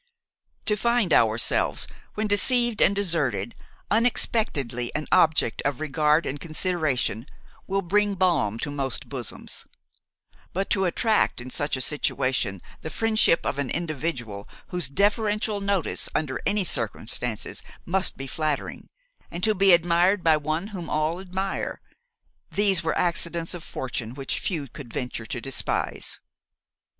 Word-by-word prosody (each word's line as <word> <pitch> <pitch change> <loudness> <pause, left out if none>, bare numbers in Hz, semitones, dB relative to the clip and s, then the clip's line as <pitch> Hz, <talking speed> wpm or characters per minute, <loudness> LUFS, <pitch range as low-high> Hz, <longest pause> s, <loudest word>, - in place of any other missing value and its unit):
To 210 - +4
find 235 -5 +2
ourselves, 110 +1 +3 0.3
when 215 - 0
deceived 235 +2 +3
and 200 - +5
deserted, 150 - 0 0.4
unexpectedly 205 - +1
an 155 - -1
object 155 -7 +3
of 140 -2 -1
regard 150 +1 +2
and 145 - -3
consideration, 155 - -1 0.4
will 195 0 0
bring 205 +3 +2
balm 165 - +2
to 145 - -2
most 135 -3 -2
bosoms; 125 -5 -4 0.9
but 195 +2 -2
to 190 -2 +3
attract 215 - +2
in 125 +1 -1
such 145 0 -1
a - - -3
situation 130 - 0 0.2
the 155 - -5
friendship 220 -3 +2
of 140 - -1
an 140 -3 -1
individual 145 -11 -3 0.2
whose 180 -6 -2
deferential 210 - +1
notice 200 -3 0
under 145 -4 -1
any 205 0 +2
circumstances 115 - -2 0.2
must 190 +2 0
be 135 - -5
flattering, 150 +2 -3 0.4
and 175 +1 -6
to 215 - +4
be 195 -1 +5
admired 175 +3 +4
by 160 -1 +5
one 155 +4 -1
whom 185 -5 -6
all 155 +3 0
admire, 190 +1 -3 0.7
these 195 -4 +3
are 160 - 0
accidents 170 -1 0
of 175 -2 -7
fortune 125 -5 -5
which 135 -1 -3
few 155 -7 -2
could 120 0 -10
venture 125 -3 -4
to 125 - -3
despise. 135 +2 -3
165 Hz, 135 wpm, -25 LUFS, 135-195 Hz, 0.9 s, and